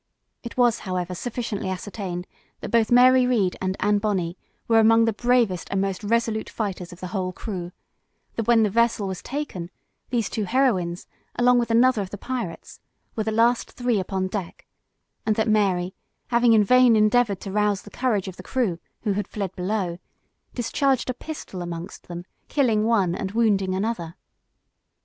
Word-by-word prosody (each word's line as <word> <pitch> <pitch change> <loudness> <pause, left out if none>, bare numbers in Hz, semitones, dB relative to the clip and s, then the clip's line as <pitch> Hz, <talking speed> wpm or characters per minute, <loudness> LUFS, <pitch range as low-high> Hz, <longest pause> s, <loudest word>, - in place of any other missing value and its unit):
It 235 - -9
was, 240 -2 +3
however, 180 -2 -3
sufficiently 220 -1 -4
ascertained, 185 -2 -5 0.4
that - - -6
both 230 -2 +3
Mary 250 +1 +6
Read 210 -8 +1
and 185 0 -1
Anne 205 0 +2
Bonney 190 -5 -1 0.3
were 225 -1 +5
among 225 +1 +5
the 225 - +1
bravest 235 -6 +1
and 195 - 0
most 195 0 -2
resolute 225 0 0
fighters 190 -5 -4
of 175 - -13
the 185 - -5
whole 185 -1 -2
crew; 180 -3 -6 0.6
that 225 -1 -2
when 235 -2 +5
the 210 - +1
vessel 230 -2 +2
was 190 -2 -5
taken, 245 - -5 0.4
these 235 -4 0
two 215 - -2
heroines, 190 -8 +1 0.3
along 245 0 +4
with 235 - -1
another 235 0 +4
of 190 - -5
the 205 - -7
pirates, 235 -6 -5 0.4
were 220 - -1
the 220 - 0
last 230 +2 +2
three 245 -4 0
upon 190 0 -2
deck; 185 -2 -5 0.6
and 215 -1 +1
that 220 - +1
Mary, 190 -4 +2 0.4
having 235 -1 +4
in 215 -1 +6
vain 250 +2 +5
endeavored 215 -1 +3
to 195 - -6
rouse 210 -1 +1
the - - -13
courage 220 -7 0
of 185 - -7
the - - -8
crew, 200 -6 -1 0.2
who 210 -3 +1
had 205 0 -2
fled 195 -3 -4
below, 180 -2 -2 0.6
discharged 255 +2 +1
a - - -5
pistol 250 - -7
amongst 175 +1 -7
them, 175 0 -7 0.2
killing 225 -7 +2
one 200 -7 +2
and 190 +2 -4
wounding 200 -5 +2
another. 190 -5 -3
210 Hz, 175 wpm, -24 LUFS, 185-235 Hz, 0.6 s, Mary